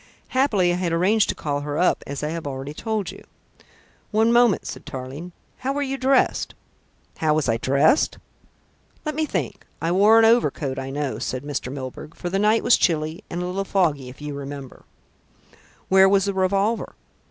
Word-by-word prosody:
Happily 210 Hz, -10 st, +2 dB
I -, -, -1 dB
had 180 Hz, -2 st, -1 dB
arranged 195 Hz, +6 st, +2 dB
to -, -, 0 dB
call 145 Hz, -2 st, -2 dB
her 145 Hz, 0 st, -4 dB
up, 180 Hz, -, +2 dB
as 140 Hz, +1 st, -5 dB
I 150 Hz, -, -1 dB
have 165 Hz, -2 st, -4 dB
already 135 Hz, +1 st, -5 dB
told 210 Hz, 0 st, -3 dB
you." -, -, -13 dB, 0.9 s
"One 220 Hz, +2 st, +3 dB
moment," 240 Hz, -4 st, +4 dB
said -, -, -7 dB
Tarling. 145 Hz, +4 st, -7 dB, 0.3 s
"How 270 Hz, +2 st, -1 dB
were 290 Hz, +1 st, -1 dB
you 270 Hz, -1 st, -2 dB
dressed?" 265 Hz, 0 st, +1 dB, 0.6 s
"How 155 Hz, -1 st, +2 dB
was 155 Hz, -3 st, 0 dB
I 115 Hz, -1 st, +2 dB
dressed? 140 Hz, -, +2 dB, 0.9 s
Let 305 Hz, -, -1 dB
me 310 Hz, +1 st, -1 dB
think. -, -, -3 dB, 0.2 s
I 165 Hz, -, -1 dB
wore 205 Hz, +5 st, +6 dB
a -, -, +5 dB
heavy 225 Hz, +1 st, +7 dB
overcoat, 140 Hz, -, -3 dB
I 135 Hz, 0 st, -5 dB
know," 140 Hz, 0 st, -3 dB
said 130 Hz, +1 st, -3 dB
Mr. 140 Hz, -3 st, -4 dB
Milburgh, 135 Hz, +3 st, -7 dB
"for 175 Hz, -, -5 dB
the 195 Hz, -, +1 dB
night 215 Hz, +2 st, +3 dB
was -, -, +5 dB
chilly 155 Hz, -1 st, 0 dB
and 175 Hz, +1 st, -3 dB
a -, -, -2 dB
little 185 Hz, +2 st, -2 dB
foggy, 155 Hz, -10 st, 0 dB
if 130 Hz, +4 st, -12 dB
you 150 Hz, -1 st, -4 dB
remember." 140 Hz, -1 st, -8 dB, 1.0 s
"Where 190 Hz, 0 st, +6 dB
was 195 Hz, 0 st, +3 dB
the 200 Hz, -, -1 dB
revolver?" 195 Hz, +4 st, 0 dB
175 Hz, 190 wpm, -23 LUFS, 145-210 Hz, 1.0 s, heavy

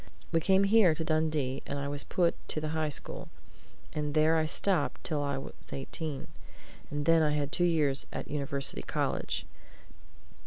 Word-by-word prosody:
We 165 Hz, -, +3 dB
came 190 Hz, +4 st, +3 dB
here 200 Hz, -5 st, +5 dB
to 160 Hz, -, -3 dB
Dundee, 155 Hz, -4 st, 0 dB
and 140 Hz, -, -3 dB
I 140 Hz, 0 st, -3 dB
was 145 Hz, 0 st, -1 dB
put 175 Hz, -2 st, +1 dB, 0.2 s
to -, -, -1 dB
the 155 Hz, 0 st, -3 dB
High 155 Hz, -1 st, -1 dB
School, 145 Hz, -, -4 dB, 0.6 s
and 150 Hz, -1 st, -2 dB
there 155 Hz, +1 st, +4 dB
I 160 Hz, -1 st, +2 dB
stopped 190 Hz, +3 st, 0 dB
till 155 Hz, -4 st, -1 dB
I 140 Hz, -1 st, -1 dB
was 135 Hz, -, -7 dB, 0.2 s
eighteen, 140 Hz, +1 st, -4 dB, 0.6 s
and 145 Hz, 0 st, -3 dB
then 165 Hz, 0 st, +5 dB
I 150 Hz, -1 st, +2 dB
had 145 Hz, -1 st, -1 dB
two 175 Hz, -, +2 dB
years 150 Hz, -5 st, +5 dB
at -, -, -5 dB
University 140 Hz, -, -2 dB
College. -, -, -2 dB
155 Hz, 170 wpm, -30 LUFS, 140-165 Hz, 0.6 s, here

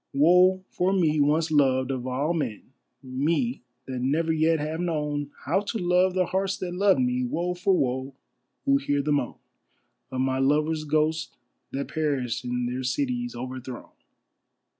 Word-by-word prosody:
Woe 180 Hz, +6 st, +5 dB
for 185 Hz, +2 st, +1 dB
me 160 Hz, -5 st, +2 dB
once 155 Hz, +3 st, +2 dB
loved 135 Hz, -3 st, +3 dB
of 130 Hz, -1 st, -3 dB
all 140 Hz, +6 st, 0 dB
men, 130 Hz, -6 st, -4 dB, 0.3 s
me 155 Hz, -, -1 dB, 0.2 s
that 130 Hz, -1 st, -4 dB
never 155 Hz, +6 st, +1 dB
yet 160 Hz, +1 st, +3 dB
have 155 Hz, +2 st, -3 dB
known 150 Hz, -4 st, -2 dB, 0.2 s
How 165 Hz, +8 st, +2 dB
to 205 Hz, +3 st, -3 dB
love 180 Hz, 0 st, +2 dB
the 185 Hz, -1 st, +2 dB
hearts 190 Hz, +2 st, -1 dB
that 180 Hz, -1 st, -4 dB
loved 195 Hz, -4 st, +3 dB
me. 125 Hz, 0 st, +1 dB
Woe 170 Hz, +8 st, -1 dB
for 185 Hz, +1 st, +2 dB
woe, 130 Hz, 0 st, -1 dB, 0.5 s
who 275 Hz, 0 st, +4 dB
hear 145 Hz, -, 0 dB
the 150 Hz, -, 0 dB
moan 140 Hz, -4 st, 0 dB, 0.7 s
Of 130 Hz, -1 st, -2 dB
my 130 Hz, 0 st, 0 dB
lovers' 155 Hz, +3 st, +1 dB
ghosts 155 Hz, +1 st, 0 dB, 0.3 s
that 140 Hz, +1 st, -3 dB
perished 140 Hz, -6 st, -1 dB
in 125 Hz, 0 st, -2 dB
their 125 Hz, +2 st, -3 dB
cities 245 Hz, -, -2 dB
overthrown. 130 Hz, 0 st, -7 dB
150 Hz, 160 wpm, -26 LUFS, 130-180 Hz, 0.7 s, Woe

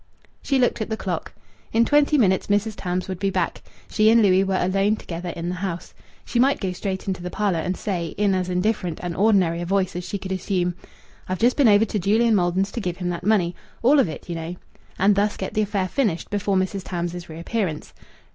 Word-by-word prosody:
She 275 Hz, -, +1 dB
looked 245 Hz, -3 st, +1 dB
at 220 Hz, -, -3 dB
the 220 Hz, -, -2 dB
clock. 180 Hz, -6 st, -4 dB, 0.4 s
In 230 Hz, +1 st, +3 dB
twenty 295 Hz, +2 st, +4 dB
minutes 190 Hz, -7 st, +2 dB
Mrs. 205 Hz, +2 st, +1 dB
Tams 180 Hz, -1 st, -3 dB
would 185 Hz, -2 st, -5 dB
be 195 Hz, -, +1 dB
back. -, -, -1 dB, 0.3 s
She 215 Hz, 0 st, +3 dB
and 230 Hz, +1 st, +6 dB
Louis 190 Hz, -1 st, +4 dB
were 190 Hz, -1 st, 0 dB
alone 195 Hz, +3 st, +2 dB
together 175 Hz, -3 st, -6 dB
in 170 Hz, 0 st, -4 dB
the 180 Hz, -, -1 dB
house. 180 Hz, -3 st, -4 dB, 0.3 s
She 240 Hz, -, -1 dB
might 275 Hz, +3 st, +3 dB
go 190 Hz, -3 st, -2 dB
straight 190 Hz, +1 st, -4 dB
into 185 Hz, -2 st, -2 dB
the 180 Hz, -, -4 dB
parlour, 195 Hz, -3 st, 0 dB
and 180 Hz, +3 st, -2 dB
say, 175 Hz, -6 st, -3 dB
in 205 Hz, -1 st, +2 dB
as 185 Hz, -1 st, -1 dB
indifferent 180 Hz, -2 st, -1 dB
and 175 Hz, -1 st, -3 dB
ordinary 185 Hz, -5 st, +3 dB
a -, -, -3 dB
voice 190 Hz, -1 st, 0 dB
as 180 Hz, -, -3 dB
she 185 Hz, +3 st, -4 dB
could 190 Hz, 0 st, -7 dB
assume: 185 Hz, -2 st, -1 dB, 0.6 s
"I've 185 Hz, -, -1 dB
just 240 Hz, +5 st, +3 dB
been 280 Hz, -4 st, +4 dB
over 205 Hz, +1 st, +6 dB
to 210 Hz, 0 st, -2 dB
Julian 220 Hz, +5 st, +3 dB
Maldon's 185 Hz, +1 st, +1 dB
to 235 Hz, -, -4 dB
give 180 Hz, -3 st, -3 dB
him 180 Hz, -1 st, -3 dB
that 175 Hz, 0 st, -4 dB
money 180 Hz, -4 st, +2 dB, 0.3 s
all 280 Hz, +5 st, +6 dB
of 255 Hz, -, +3 dB
it, 155 Hz, -, -8 dB
you 175 Hz, -, -4 dB
know," 165 Hz, +1 st, -5 dB, 0.4 s
and 200 Hz, +2 st, +4 dB
thus 205 Hz, +1 st, +1 dB
get 190 Hz, -, -4 dB
the 215 Hz, -, +1 dB
affair 200 Hz, -2 st, -1 dB
finished 205 Hz, -7 st, -1 dB
before 205 Hz, -1 st, 0 dB
Mrs. 190 Hz, +1 st, -1 dB
Tams's 175 Hz, -1 st, -4 dB
reappearance. 170 Hz, +1 st, -3 dB
190 Hz, 225 wpm, -23 LUFS, 180-210 Hz, 0.6 s, and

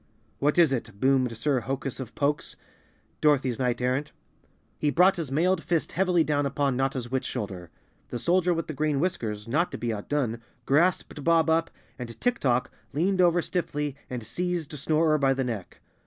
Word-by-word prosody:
"What 150 Hz, +3 st, +1 dB
is 165 Hz, -6 st, +5 dB
it?" 115 Hz, -5 st, -4 dB
boomed 130 Hz, -3 st, +2 dB
Sir 135 Hz, +2 st, +1 dB
Hokus 135 Hz, +1 st, -4 dB
of 130 Hz, -4 st, -7 dB
Pokes, 145 Hz, +1 st, -1 dB, 0.7 s
Dorothy's 135 Hz, -5 st, +2 dB
Knight 125 Hz, -2 st, 0 dB
Errant. 130 Hz, +4 st, 0 dB, 0.7 s
He 150 Hz, -, +2 dB
brought 180 Hz, +6 st, +5 dB
his 155 Hz, -6 st, -4 dB
mailed 175 Hz, +4 st, +2 dB
fist 165 Hz, -3 st, 0 dB
heavily 180 Hz, -2 st, +2 dB
down 145 Hz, -2 st, +1 dB
upon 140 Hz, -1 st, 0 dB
Notta's 130 Hz, -2 st, -1 dB
witch 130 Hz, -1 st, 0 dB
shoulder. 95 Hz, -5 st, -5 dB, 0.4 s
The -, -, -3 dB
Soldier 180 Hz, +6 st, +2 dB
with 165 Hz, -1 st, -1 dB
the 155 Hz, -, -5 dB
Green 150 Hz, -1 st, 0 dB
Whiskers, 110 Hz, -, -2 dB
not 155 Hz, +9 st, +1 dB
to -, -, -3 dB
be 120 Hz, -1 st, -2 dB
outdone, 115 Hz, +1 st, -2 dB, 0.2 s
grasped 155 Hz, 0 st, +1 dB
Bob 165 Hz, 0 st, +4 dB
Up 165 Hz, +1 st, +2 dB, 0.3 s
and 115 Hz, -2 st, -7 dB
Tik 245 Hz, -1 st, +1 dB
Tok 125 Hz, -2 st, +1 dB, 0.2 s
leaned 185 Hz, +6 st, +2 dB
over 175 Hz, -1 st, +4 dB
stiffly 150 Hz, -5 st, -2 dB
and 125 Hz, -2 st, -4 dB
seized 170 Hz, +6 st, -3 dB
Snorer 155 Hz, +1 st, +2 dB
by 135 Hz, -1 st, +3 dB
the 135 Hz, -, 0 dB
neck. 115 Hz, -7 st, -5 dB
145 Hz, 175 wpm, -27 LUFS, 125-165 Hz, 0.7 s, is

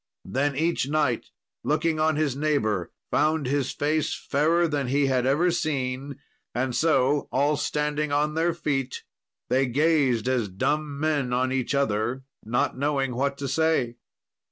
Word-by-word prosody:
Then 140 Hz, +1 st, 0 dB
each 160 Hz, -2 st, 0 dB
knight, 145 Hz, -6 st, 0 dB, 0.4 s
looking 155 Hz, +1 st, +1 dB
on 155 Hz, 0 st, +2 dB
his 150 Hz, -4 st, 0 dB
neighbour, 135 Hz, -, 0 dB, 0.2 s
found 155 Hz, 0 st, +2 dB
his 135 Hz, 0 st, 0 dB
face 155 Hz, +1 st, 0 dB
fairer 165 Hz, +5 st, +1 dB
than 145 Hz, -4 st, -1 dB
he 140 Hz, +2 st, +2 dB
had 130 Hz, -2 st, +1 dB
ever 165 Hz, +6 st, +3 dB
seen, 140 Hz, -4 st, -2 dB, 0.4 s
and 125 Hz, 0 st, -1 dB
so 145 Hz, -3 st, +2 dB
all 145 Hz, +3 st, +2 dB
standing 150 Hz, 0 st, -1 dB
on 150 Hz, +1 st, +1 dB
their 165 Hz, +2 st, +1 dB
feet 135 Hz, -5 st, -2 dB, 0.5 s
they 130 Hz, +1 st, +2 dB
gazed 135 Hz, -4 st, +2 dB
as 125 Hz, -5 st, 0 dB
dumb 145 Hz, +9 st, -1 dB
men 145 Hz, -5 st, 0 dB
on 130 Hz, +1 st, +1 dB
each 130 Hz, +1 st, -1 dB
other, 120 Hz, 0 st, 0 dB, 0.2 s
not 120 Hz, +3 st, 0 dB
knowing 135 Hz, -1 st, 0 dB
what 140 Hz, +3 st, -1 dB
to 140 Hz, -, -4 dB
say. 135 Hz, -5 st, +1 dB
140 Hz, 150 wpm, -25 LUFS, 130-155 Hz, 0.5 s, ever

